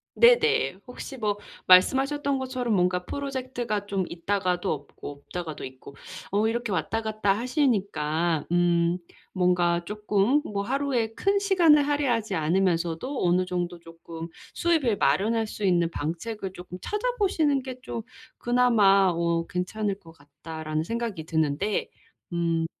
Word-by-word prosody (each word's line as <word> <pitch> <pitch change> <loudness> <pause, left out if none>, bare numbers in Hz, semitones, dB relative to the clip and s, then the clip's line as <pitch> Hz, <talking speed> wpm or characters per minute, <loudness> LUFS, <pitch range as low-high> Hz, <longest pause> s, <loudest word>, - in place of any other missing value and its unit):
네네. 460 - +4
혹시 265 +2 -8
뭐 210 -3 -1 0.3
말씀하셨던 270 +9 +4
것처럼 255 -3 -2
뭔가 180 -1 +1
프로젝트가 255 -6 -3
좀 195 -2 -1
있다가도 180 +1 -1
없고 145 -1 -6
없다가도 155 +2 -7
있고 130 +1 -11 0.4
어 210 +2 +2
이렇게 235 -1 -2
왔다 225 +5 -1
갔다 215 -2 +1
하시니까 195 - 0
음 175 0 +2 0.4
뭔가 175 -2 +2
쪼끔 210 +6 +1
뭐 200 -1 -3
'하루에 250 -3 -1
큰 395 - +1
시간을 335 -8 +4
할애하지 240 -9 0
않으면서도 175 - 0
어느 180 +1 +3
정도 175 -1 -3
쪼끔 165 0 -9 0.3
수입을 310 - +2
마련할 215 +11 +2
수 210 - -7
있는 175 -3 +3
방책을 190 +6 -4
쪼끔 180 0 -9
찾아보시는 400 - 0
게 265 - -7
좀 230 -3 -5 0.4
그나마 220 -6 +4
어 170 0 0
괜찮을 200 +2 -2
것 165 -4 -15
같다.'라는 155 +1 -5
생각이 230 -5 -3
드는데. 160 +6 0 0.4
음. 165 -1 0
200 Hz, 295 characters per minute, -26 LUFS, 170-250 Hz, 0.4 s, 네네